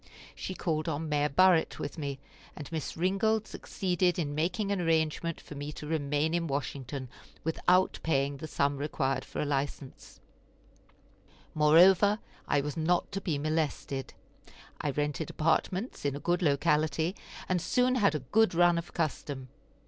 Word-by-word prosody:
She 185 - -6
called 155 -2 -1
on 155 +1 -3
Mayor 150 0 +1
Burritt 180 +2 +4
with 145 - -5
me, 140 -2 -3 0.4
and 150 0 -8
Miss 160 -1 -4
Ringold 195 +5 +1
succeeded 180 -1 -1
in 150 -4 -2
making 180 +7 -1
an 200 -2 0
arrangement 165 0 0
for - - -11
me 145 +1 -5
to 150 - -8
remain 150 0 0
in 170 -1 0
Washington 135 -1 -4 0.4
without 180 +3 +2
paying 140 -2 0
the 155 - -7
sum 140 -1 0
required 135 -2 -1
for - - -7
a - - 0
license; 140 -1 -4 1.3
moreover, 180 +7 +6 0.3
I 145 - +2
was 150 +2 -4
not 170 +2 +1
to 195 0 -3
be 160 -6 -1
molested. 150 -3 -2 0.7
I 150 - -1
rented 145 +2 -2
apartments 185 +7 -1
in 140 -1 0
a - - -5
good 175 +5 0
locality, 155 +2 +1 0.3
and 180 -2 +1
soon 250 +7 +2
had 205 -9 +3
a 150 - -2
good 220 -4 +4
run 175 0 +4
of 170 - -9
custom. 140 -5 -3
155 Hz, 155 wpm, -30 LUFS, 145-175 Hz, 1.3 s, moreover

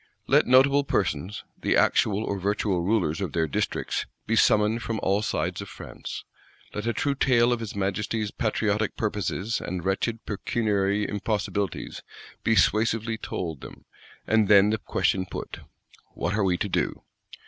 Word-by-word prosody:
_ - - -34 0.2
Let - - +4
notable 135 +3 +5
persons, 105 -6 -1 0.2
the - - +2
actual 105 0 +3
or 100 -2 -2
virtual 100 -1 0
rulers 90 -3 +1
of 90 -7 -3
their 80 -1 +2
districts, 75 - -2 0.2
be 115 - +1
summoned 110 +1 +3
from 115 -2 -3
all 100 +2 +2
sides - - -2
of - - -8
France: - - -8 0.5
let 105 +2 -4
a - - +3
true 140 +5 0
tale, 125 -3 +3
of 120 - -2
his 110 -3 -6
Majesty's 100 +2 -1
patriotic 105 -1 0
purposes 105 +1 -2
and 90 -1 -4
wretched 110 +4 -1
pecuniary 105 -1 0
impossibilities, 105 -1 -2 0.4
be 115 - +3
suasively 110 +2 +2
told 80 -6 -4
them; - - -11 0.4
and 110 -2 +3
then 100 0 +6
the 110 - 0
question 95 -2 0
put: - - -6 0.6
What 90 - -1
are 105 -1 +1
we 90 -2 +2
to 105 - -1
do? 95 - -1
105 Hz, 160 wpm, -26 LUFS, 95-110 Hz, 0.6 s, then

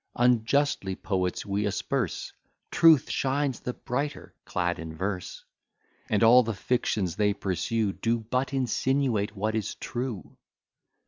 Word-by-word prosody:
Unjustly 120 -3 +2
poets 90 -2 -2
we 100 0 -1
asperse; 100 - -2 0.4
Truth 160 -5 +6
shines 135 -1 0
the 125 - -4
brighter 140 +5 -4
clad 90 -2 -1
in 80 -1 -7
verse, 95 +1 -4 0.6
And 110 0 +2
all 120 +3 +8
the 115 -3 -3
fictions 95 -6 -1
they 105 -1 +2
pursue 100 +2 -1
Do 115 +3 0
but 125 +5 -1
insinuate 130 -4 0
what 105 +2 -1
is 110 -3 -2
true. 120 - -5
110 Hz, 125 wpm, -27 LUFS, 100-125 Hz, 0.6 s, all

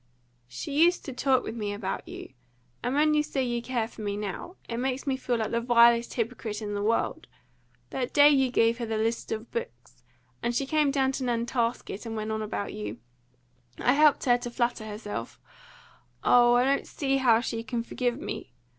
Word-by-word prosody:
"She 290 - 0
used 350 +1 +2
to 270 - -5
talk 260 0 +2
with - - -5
me 210 -3 -3
about 200 -2 -4
you; - - -9 0.5
and 250 +2 -1
when 305 +1 +4
you 300 - +4
say 275 -3 -2
you 240 -1 -1
care 240 -2 -2
for 225 - -12
me 205 -1 -2
now, 210 - -5
it 230 - -4
makes 260 +2 -2
me 270 -2 0
feel 250 -2 -1
like 220 -2 -2
the 235 - 0
vilest 235 0 +4
hypocrite 230 -2 -3
in 210 -2 -4
the 205 - -2
world. 225 +3 0 0.6
That 255 -2 -2
day 290 0 +7
you 270 -2 +3
gave 230 -1 +2
her 235 - -2
the 220 0 -1
list 225 +2 -1
of 220 +1 -4
books, 475 +1 -7 0.4
and 235 0 -1
she 275 - +1
came 300 0 +2
down 270 -1 +2
to 270 - -4
Nantasket, 235 -2 -2
and 225 - -4
went 215 0 -3
on 220 0 -2
about 210 -1 -4
you, 105 +1 -5 0.8
I 245 - +3
helped 300 0 +4
her 245 -1 +4
to 240 - -5
flatter 240 -2 -1
herself 205 - -6 0.8
oh! 240 0 +6
I 245 - +4
don't 275 +1 +1
see 275 -2 0
how 240 -4 +4
she 230 -1 -3
can 230 +1 -3
forgive 245 +1 -2
me. 130 - -6
240 Hz, 200 wpm, -27 LUFS, 220-265 Hz, 0.8 s, day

